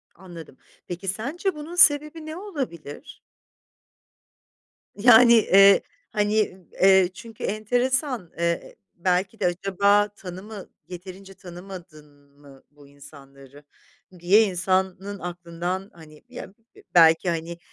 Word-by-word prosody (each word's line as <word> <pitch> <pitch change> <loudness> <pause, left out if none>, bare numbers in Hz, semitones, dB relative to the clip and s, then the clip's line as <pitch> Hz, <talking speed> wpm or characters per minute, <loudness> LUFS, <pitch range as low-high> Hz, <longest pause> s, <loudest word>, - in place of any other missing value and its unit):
Anladım, 170 -6 -13 0.3
peki, 180 +2 -7
sence 275 - -3
bunun 300 +3 -9
sebebi 305 -1 +3
ne 310 0 -7
olabilir? 270 - -8 1.8
Yani, 235 +2 +6
eee, 195 -3 +6 0.3
hani, 210 -2 0 0.2
eee, 190 -1 +5
çünkü 225 +3 -12
enteresan, 245 - -2
eee, 170 0 -3 0.2
belki 185 +4 -1
de 200 - -1
acaba 200 +3 +1
tanımı 195 +2 -10 0.2
yeterince 185 +2 -11
tanımadın 170 -6 -13
mı 140 -2 -18
bu 145 -1 -19
insanları 140 0 -16 0.6
diye 190 +6 +4
insanın 190 +1 -2
aklından 175 +2 -5
hani 155 -2 -16
ya 245 -6 -10 0.4
belki 165 +1 +5
hani 170 0 -4
190 Hz, 100 wpm, -23 LUFS, 170-215 Hz, 1.8 s, Yani